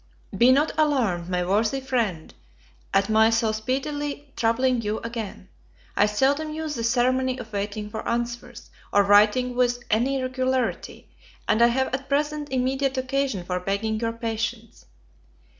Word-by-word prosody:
BE 245 Hz, +2 st, +5 dB
not 290 Hz, +4 st, +3 dB
alarmed, 230 Hz, -, +1 dB
my 180 Hz, -1 st, 0 dB
worthy 215 Hz, +7 st, +1 dB
friend, 235 Hz, -11 st, -2 dB, 0.6 s
at 195 Hz, 0 st, +2 dB
my 220 Hz, +1 st, +4 dB
so 225 Hz, -1 st, +1 dB
speedily 280 Hz, +5 st, -3 dB
troubling 240 Hz, +2 st, +1 dB
you 215 Hz, 0 st, -2 dB
again; 230 Hz, -5 st, -6 dB, 0.5 s
I 205 Hz, -, +4 dB
seldom 280 Hz, +8 st, +1 dB
use 310 Hz, -1 st, -4 dB
the 230 Hz, -, -4 dB
ceremony 255 Hz, +2 st, +1 dB
of 225 Hz, -3 st, -9 dB
waiting 205 Hz, +1 st, -3 dB
for 220 Hz, +1 st, -5 dB
answers, 240 Hz, 0 st, -4 dB, 0.2 s
or 205 Hz, -, +4 dB
writing 210 Hz, +5 st, +4 dB
with 245 Hz, -1 st, +1 dB
any 255 Hz, +5 st, +2 dB
regularity, 255 Hz, -1 st, -2 dB, 0.4 s
and 220 Hz, -, +2 dB
I 235 Hz, -, +8 dB
have 260 Hz, +2 st, 0 dB
at 270 Hz, +1 st, -3 dB
present 295 Hz, +1 st, -1 dB
immediate 265 Hz, +1 st, 0 dB
occasion 260 Hz, -7 st, -1 dB
for 180 Hz, 0 st, -2 dB
begging 200 Hz, +4 st, -2 dB
your 230 Hz, 0 st, -1 dB
patience. 225 Hz, 0 st, -4 dB
240 Hz, 145 wpm, -24 LUFS, 215-265 Hz, 0.6 s, I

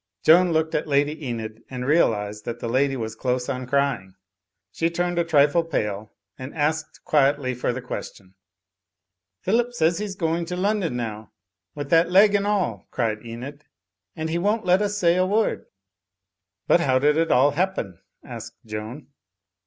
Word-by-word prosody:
Joan 175 Hz, +2 st, +6 dB
looked 160 Hz, 0 st, 0 dB
at 155 Hz, -, -1 dB
Lady 145 Hz, +1 st, 0 dB
Enid 110 Hz, -2 st, -5 dB
and 125 Hz, -1 st, -5 dB
realised 105 Hz, -9 st, +1 dB
that 120 Hz, -, -5 dB
the -, -, -4 dB
lady 135 Hz, +3 st, +1 dB
was 110 Hz, -2 st, -4 dB
close 125 Hz, +2 st, -2 dB
on 130 Hz, -2 st, -4 dB
cr3ring. 135 Hz, -9 st, 0 dB, 0.6 s
She 165 Hz, -, 0 dB
turned 175 Hz, +1 st, -1 dB
a -, -, +3 dB
trifle 155 Hz, 0 st, +3 dB
pale 105 Hz, -9 st, -3 dB, 0.3 s
and 130 Hz, +4 st, -8 dB
asked 155 Hz, 0 st, -2 dB
quietly 140 Hz, -3 st, +2 dB
for 125 Hz, 0 st, -1 dB
the 125 Hz, +1 st, -6 dB
question. 95 Hz, -6 st, -8 dB, 1.1 s
"Phillip 240 Hz, +5 st, +1 dB
says 165 Hz, -3 st, +2 dB
he's 205 Hz, -2 st, -4 dB
going 165 Hz, -1 st, -1 dB
to 180 Hz, +1 st, -4 dB
London 195 Hz, -, 0 dB
now, 110 Hz, -3 st, -6 dB, 0.4 s
with 145 Hz, -1 st, -6 dB
that 165 Hz, +1 st, +5 dB
leg 200 Hz, +3 st, +6 dB
and 205 Hz, 0 st, +1 dB
all," 185 Hz, -, -1 dB
cried 110 Hz, -3 st, -2 dB
Enid, 125 Hz, +6 st, -8 dB, 0.5 s
"and 160 Hz, 0 st, -3 dB
he 170 Hz, -, 0 dB
won't 210 Hz, +4 st, 0 dB
let 180 Hz, +2 st, +4 dB
us 205 Hz, 0 st, -1 dB
say 175 Hz, -2 st, +3 dB
a 185 Hz, -, +3 dB
word." 215 Hz, +3 st, 0 dB, 1.0 s
"But -, -, +4 dB
how 130 Hz, -6 st, +2 dB
did 145 Hz, +3 st, +3 dB
it 165 Hz, +1 st, +1 dB
all 140 Hz, +3 st, +5 dB
happen?" 150 Hz, -, -2 dB, 0.2 s
asked -, -, -9 dB
Joan. 110 Hz, +6 st, -7 dB
145 Hz, 170 wpm, -24 LUFS, 125-170 Hz, 1.1 s, Joan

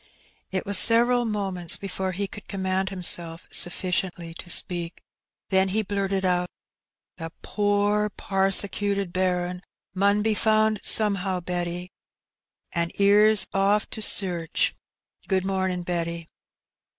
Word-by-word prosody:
It 190 Hz, -1 st, -2 dB
was 200 Hz, -1 st, +2 dB
several 240 Hz, +1 st, +3 dB
moments 195 Hz, -6 st, -1 dB
before 190 Hz, -1 st, -4 dB
he 200 Hz, +2 st, -3 dB
could 205 Hz, -, -11 dB
com 195 Hz, -2 st, -5 dB
mand 190 Hz, 0 st, 0 dB
himself 170 Hz, -3 st, +1 dB
sufficiently 175 Hz, -1 st, 0 dB
to 175 Hz, -, -10 dB
speak, 175 Hz, -1 st, -1 dB, 0.5 s
then 190 Hz, 0 st, +3 dB
he 215 Hz, +3 st, 0 dB
blurted 195 Hz, -1 st, -2 dB
out 180 Hz, -1 st, +1 dB, 0.4 s
— -, -, -65 dB
"The 165 Hz, -2 st, -6 dB
poor 205 Hz, 0 st, +1 dB
parsecuted 195 Hz, 0 st, -1 dB
bairn 180 Hz, -1 st, -1 dB, 0.3 s
mun 200 Hz, +2 st, +2 dB
be 220 Hz, 0 st, +1 dB
found 215 Hz, 0 st, +2 dB
somehow, 195 Hz, -3 st, +2 dB
Betty, 175 Hz, +1 st, -4 dB, 0.8 s
an* 170 Hz, -1 st, -1 dB
'ere's 205 Hz, +1 st, +5 dB
off 200 Hz, +2 st, +2 dB
to 220 Hz, -, -5 dB
sairch. 175 Hz, -6 st, +2 dB, 0.5 s
Good 190 Hz, -1 st, 0 dB
momin', 190 Hz, -2 st, -1 dB
Betty." 170 Hz, -1 st, -3 dB
190 Hz, 125 wpm, -25 LUFS, 180-205 Hz, 0.8 s, ere's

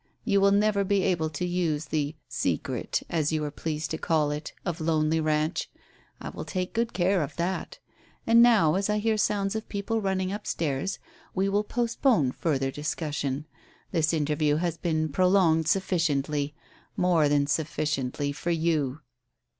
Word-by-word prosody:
You 200 Hz, -3 st, +3 dB
will 200 Hz, -, +6 dB
never 205 Hz, 0 st, +3 dB
be 195 Hz, 0 st, +1 dB
able 165 Hz, -4 st, +1 dB
to 155 Hz, +3 st, -3 dB
use 170 Hz, -4 st, -1 dB
the 150 Hz, -1 st, -2 dB
'Secret' -, -, -2 dB
as 155 Hz, -2 st, 0 dB
you 155 Hz, -1 st, 0 dB
are 150 Hz, -, -3 dB
pleased 155 Hz, 0 st, -4 dB
to 160 Hz, -, -3 dB
call 155 Hz, -3 st, +1 dB
it 150 Hz, +1 st, -5 dB
of 175 Hz, -2 st, -3 dB
Lonely 155 Hz, 0 st, +2 dB
Ranch. 155 Hz, +1 st, 0 dB, 0.5 s
I -, -, -6 dB
will -, -, -6 dB
take 185 Hz, -1 st, -3 dB
good 230 Hz, 0 st, 0 dB
care 180 Hz, +1 st, +2 dB
of 145 Hz, -1 st, -4 dB
that. 180 Hz, +2 st, -3 dB, 0.5 s
And 230 Hz, +1 st, +6 dB
now, 220 Hz, -10 st, +5 dB
as 195 Hz, +3 st, 0 dB
I 210 Hz, -, +2 dB
hear 220 Hz, +1 st, +1 dB
sounds 205 Hz, -1 st, 0 dB
of 220 Hz, -, -4 dB
people 220 Hz, +2 st, -2 dB
running 190 Hz, -1 st, -1 dB
up 210 Hz, 0 st, -6 dB
stairs, 155 Hz, +4 st, -1 dB, 0.4 s
we 195 Hz, +1 st, +1 dB
will 205 Hz, +1 st, +1 dB
postpone 235 Hz, -, +1 dB
further 135 Hz, -3 st, -1 dB
discussion. 145 Hz, -1 st, -3 dB, 0.5 s
This 160 Hz, -3 st, +2 dB
interview 150 Hz, -1 st, +1 dB
has 170 Hz, +1 st, -1 dB
been 155 Hz, -2 st, 0 dB
prolonged 170 Hz, -1 st, +3 dB
sufficiently 150 Hz, -6 st, 0 dB, 0.4 s
more 170 Hz, -5 st, +3 dB
than 145 Hz, -1 st, +3 dB
sufficiently 145 Hz, -2 st, -1 dB
for 150 Hz, +4 st, -4 dB
you." 160 Hz, -4 st, 0 dB
165 Hz, 160 wpm, -27 LUFS, 150-195 Hz, 0.5 s, will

